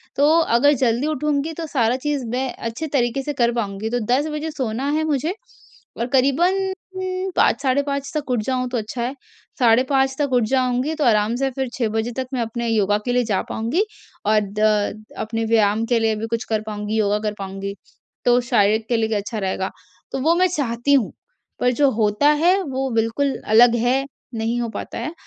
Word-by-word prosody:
तो 285 +2 +4
अगर 285 -1 +4
जल्दी 245 +3 +2
उठूँगी 300 +1 -1
तो 330 +1 -5
सारा 245 -5 +1
चीज़ 285 -1 -2
मैं 255 +2 -1
अच्छे 230 +8 -5
तरीके 245 -1 +1
से 295 - -3
कर 240 -3 +2
पाऊँगी। 210 -2 -3
तो 245 +1 0
10 285 +4 +2
बजे 300 +1 -3
सोना 260 -1 -2
है 310 +1 +1
मुझे 310 +2 0 0.7
और 235 - -1
क़रीबन 350 +9 +2 0.6
5, 240 - +3
साढ़े 270 0 +2
5 280 -1 -3
तक 295 -3 -3
उठ 245 - +1
जाऊँ, 255 +1 -1
तो 245 - -2
अच्छा 220 +2 -4
है। 255 +3 -3 0.4
साढ़े 240 0 +5
5 270 -1 +2
तक 285 -3 0
उठ 245 -2 +4
जाऊँगी, 255 +3 +1
तो 305 - -1
आराम 215 -1 +3
से 270 +2 0
फिर 265 +1 -3
6 235 -4 -1
बजे 220 +2 -1
तक 260 -1 -2
मैं 250 - 0
अपने 235 +1 -3
योगा 205 -2 +2
के 245 - 0
लिए 250 0 +3
जा 205 -4 0
पाऊँगी 245 - 0 0.4
और 215 +1 +4 0.2
द 215 0 +1 0.2
अपने 225 +1 -2
व्यायाम 220 0 +2
के 235 0 +2
लिए 225 -1 +1
भी 220 +1 -4
कुछ 230 +1 -2
कर 220 -1 +1
पाऊँगी, 210 0 -3
योगा 210 -1 +2
कर 210 -1 -2
पाऊँगी। 195 0 -5 0.5
तो 245 0 +5
शारीरिक 220 -2 +2
के 240 - +2
लिए 220 -1 0
भी 220 - 0
अच्छा 210 +2 -3
रहेगा। 190 -1 -2 0.4
तो - - -2
वो 320 +5 +4
मैं 365 +1 +4
चाहती 280 -5 0
हूँ, 265 -7 +3 0.5
पर 250 - +3
जो 280 +2 +3
होता 215 +5 +2
है 370 +3 +4
वो 270 -3 -2
बिल्कुल 230 +5 0
अलग 235 +2 +6
है, 245 +4 +1 0.3
नहीं 225 +2 -1
हो 235 - -2
पाता 220 - -6
है। 310 - -4
245 Hz, 205 wpm, -21 LUFS, 220-275 Hz, 0.7 s, अलग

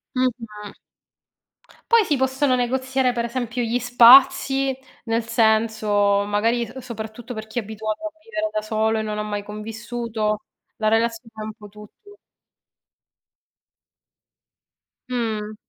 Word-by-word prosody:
Mh-mh. 230 -5 -3 1.2
Poi 460 -3 +6
si 290 - +1
possono 265 0 +1
negoziare 260 +1 0
per 235 -1 -2
esempio 245 0 -3
gli 235 +1 0
spazi, 260 +2 +6 0.3
nel 225 0 0
senso 220 -3 +2
magari, 225 +4 +1
uhm, 245 +3 -8
soprattutto 235 0 -7
per 215 -1 -6
chi 220 +3 -4
è - - -1
abituato 215 +6 -5
a - - -8
vivere 320 -8 -3
da 215 - -1
solo 220 +1 0
e - - 0
non 215 -1 -4
ha - - -1
mai 205 -1 -4
convissuto, 220 0 -4 0.3
la 215 - 0
relazione 225 +1 0
è - - -4
un 215 0 -6
po' 210 -1 -13
tutto. 210 - -16 2.9
Mh. 215 -3 -3
230 Hz, 130 wpm, -22 LUFS, 215-250 Hz, 2.9 s, Poi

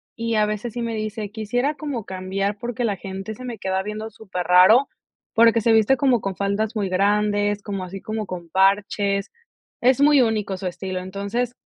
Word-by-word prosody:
y 230 0 -2
a 215 -1 +3
veces 215 +2 -4
sí 240 0 -3
me 230 -1 -2
dice: 215 -1 -4
"Quisiera 245 +6 -1
como 285 -8 -5
cambiar 195 +2 -3
porque 240 +1 -3
la 215 -4 0
gente 195 +2 -6
se 255 - -11
me 245 -2 -5
queda 190 -1 -1
viendo 215 +2 -6
superraro", 190 +4 +4 0.5
porque 230 0 +5
se 225 +1 +3
viste 220 +4 +4
como 250 -3 +2
con 195 -1 -3
faldas 205 +3 -1
muy 205 -3 0
grandes, 205 +2 +1
como 200 -2 -4
así 185 +1 -7
como 215 0 -4
con 175 -3 -7
parches. 200 +2 +1 0.5
Es 255 +1 +4
muy 290 -1 +6
único 215 -4 0
su 185 - -7
estilo. 185 +1 -4
Entonces, 200 +6 -3
210 Hz, 185 wpm, -22 LUFS, 195-230 Hz, 0.5 s, muy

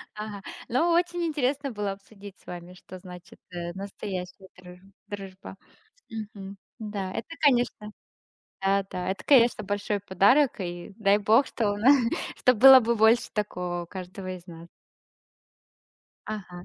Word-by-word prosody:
Ага. 210 -2 -6 0.3
Ну 325 +9 +2
очень 345 0 +1
интересно 280 -2 -1
было 205 -2 -3
обсудить 200 0 -13
с - - -25
вами, 175 0 -9
что 185 0 -12
значит, 180 -1 -13
э, 175 -1 -5
настоящая 190 -1 -7
друж 180 0 -13 0.3
дружба. 195 -1 -9 0.5
Мгм. 220 -2 -6
М, 195 0 -9 0.2
да, 205 -3 -4
это, - - -5
конечно. 245 -6 +2 0.7
Да, 195 0 +2
да- 180 0 -4
это, 195 - -7
конечно, 240 -5 +5
большой 205 +1 -2
подарок. 205 +8 +3
И 175 +2 -6
дай 205 -1 +4
бог, 225 +6 +4
что 205 -3 -1
на 225 +5 0 0.5
чтобы 250 -4 +3
было 265 0 +10
бы 235 0 0
больше 220 +2 +4
такого 180 -4 -3
у - - -14
каждого 185 0 -7
из 180 +1 -14
нас. 170 0 -11 1.6
Ага, 180 -4 -7
200 Hz, 145 wpm, -26 LUFS, 185-225 Hz, 1.6 s, было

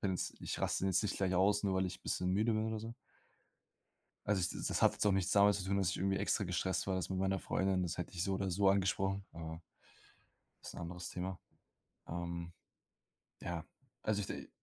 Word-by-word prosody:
bin 95 - +1
jetzt 90 - -2
ich - - -3
raste - - +1
jetzt 95 0 +3
nicht 105 - -1
gleich 95 -1 +1
aus, 100 +3 +4
nur 95 -1 +2
weil 95 0 +2
ich 90 - -7
bisschen 90 0 0
müde 110 +4 +3
bin 110 0 +1
oder 110 0 -2
so. 115 +2 -6 1.3
Also 105 -2 +3
ich 90 -1 +2
das - - -2
das - - 0
hat - - +6
jetzt - - -1
auch 100 - +5
nichts 95 -1 +1
damit 100 0 +6
zu 95 - -3
tun, 100 +1 +1
dass 95 -3 +2
ich - - -2
irgendwie 95 +1 +1
extra 100 0 +1
gestresst 95 +2 0
war. 95 - +1
Das 95 - -2
mit 95 -1 -1
meiner 95 0 +1
Freundin, 95 -1 +1
das 85 - -3
hätte - - -4
ich 90 -1 -1
so 95 - 0
oder 95 0 -1
so 95 +2 +4
angesprochen, 95 0 +1
äh 80 -1 -6 1.1
ist - - -7
'n - - -7
anderes 90 0 -5
Thema. 90 +1 -4 0.7
Ähm, 85 0 -4 0.9
ja, 85 -2 -3 0.4
also 105 -1 +1
ich 95 - -2
d - - -6
95 Hz, 220 wpm, -35 LUFS, 90-100 Hz, 1.3 s, hat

